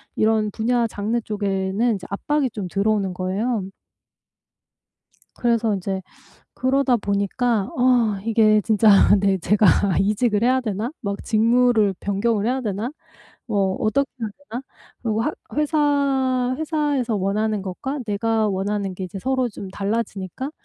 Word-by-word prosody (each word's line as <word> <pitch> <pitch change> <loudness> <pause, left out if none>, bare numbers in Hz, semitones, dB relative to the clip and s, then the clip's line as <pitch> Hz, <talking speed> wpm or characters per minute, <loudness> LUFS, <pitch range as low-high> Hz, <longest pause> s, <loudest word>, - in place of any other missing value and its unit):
이런 215 -1 +2
분야 235 +2 +1
장르 220 +3 -2
쪽에는 205 +1 -1
이제 185 -2 -8
압박이 280 +7 0
좀 200 -4 -5
들어오는 200 0 0
거예요. 195 +6 -1 1.7
그래서 230 -3 +1
이제 190 0 -3 0.5
그러다 260 -1 +2
보니까 205 +1 0
아 245 -5 +3
이게 215 -1 +4
진짜 220 +1 +3 0.3
'내 195 -1 +2
제가 205 +4 +3 0.3
이직을 210 +2 +1
해야 260 +1 +3
되나? 220 +2 -3
막 200 -4 -4
직무를 225 -2 +3
변경을 205 +2 0
해야 255 +2 0
되나? 215 +1 -3 0.6
뭐 195 -4 0
어떻게 270 +6 +1
해야 225 - -2 0.2
되나?' 240 +4 -4 0.4
그리고 225 -2 0
하 300 - -1 0.2
회사, 280 -4 +1
회사에서 295 -7 0
원하는 205 +1 -1
것과 265 +10 -4
내가 220 +1 0
원하는 195 0 -2
게 185 - -5
이제 195 +2 -7
서로 260 +1 0
좀 200 -3 -8
달라지니까 205 +4 -3
220 Hz, 285 characters per minute, -22 LUFS, 200-250 Hz, 1.7 s, 이게